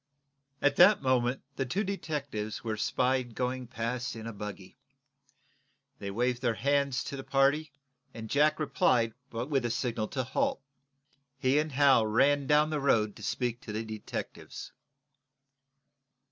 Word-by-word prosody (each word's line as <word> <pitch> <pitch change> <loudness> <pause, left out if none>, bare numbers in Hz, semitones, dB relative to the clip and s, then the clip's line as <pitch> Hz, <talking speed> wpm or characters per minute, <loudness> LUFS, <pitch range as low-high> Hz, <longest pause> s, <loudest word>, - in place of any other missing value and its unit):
At 145 -1 +3
that 205 -7 +7
moment 130 0 +1
the 135 - 0
two 195 - 0
detectives 145 - -4
were 115 -2 -2
espied 125 +2 0
going 125 0 -2
past 120 +1 -3
in 110 -1 -7
a 115 - -5
buggy. 105 -3 -8 1.2
They 100 - -5
waved 120 +4 0
their 120 -3 +1
hands 140 +1 +1
to - - -5
the 135 - -6
party. 140 +3 +2 0.5
Jack 150 +7 +2
replied 125 -5 +2 0.2
by 115 - -4
a 135 -3 0
signal 115 -2 -1
to 130 +3 -2
halt. 130 - 0 0.8
He 135 +1 +2
and 155 0 -1
Hal 135 -5 +5
ran 140 +5 +3
down 150 +1 +4
to 155 - -1
the - - -3
road 110 -7 +2
to - - -12
speak 120 +3 -2
to 120 - -8
the 110 +2 -3
detectives. 110 -1 -7
130 Hz, 145 wpm, -30 LUFS, 115-140 Hz, 1.2 s, that